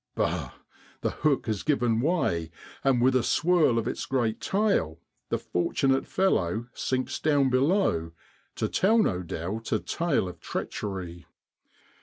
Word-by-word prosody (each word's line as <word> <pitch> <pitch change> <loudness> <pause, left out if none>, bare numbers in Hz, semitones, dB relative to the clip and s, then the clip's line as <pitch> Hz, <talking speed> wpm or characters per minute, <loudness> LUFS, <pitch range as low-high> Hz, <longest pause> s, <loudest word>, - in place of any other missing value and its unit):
Bah! - - -1 0.5
the - - 0
hook 150 -3 +1
has 110 -4 -2
given 120 -6 +1
way, 125 - 0 0.3
and 130 -3 +3
with 130 0 +4
a 130 - +4
swirl 160 -1 +3
of 115 - 0
its - - -3
great 120 -5 0
tail 195 - +1 0.3
the - - +1
fortunate 135 +9 0
fellow 110 - +1
sinks 130 0 -2
down 145 -4 +2
below 130 - +2 0.4
to - - -1
tell 215 +5 +3
no 95 - +2
doubt 95 +6 -5
a - - +3
tale 165 - -1
of 90 -2 -9
treachery. 90 -3 -5
125 Hz, 140 wpm, -27 LUFS, 95-150 Hz, 0.5 s, with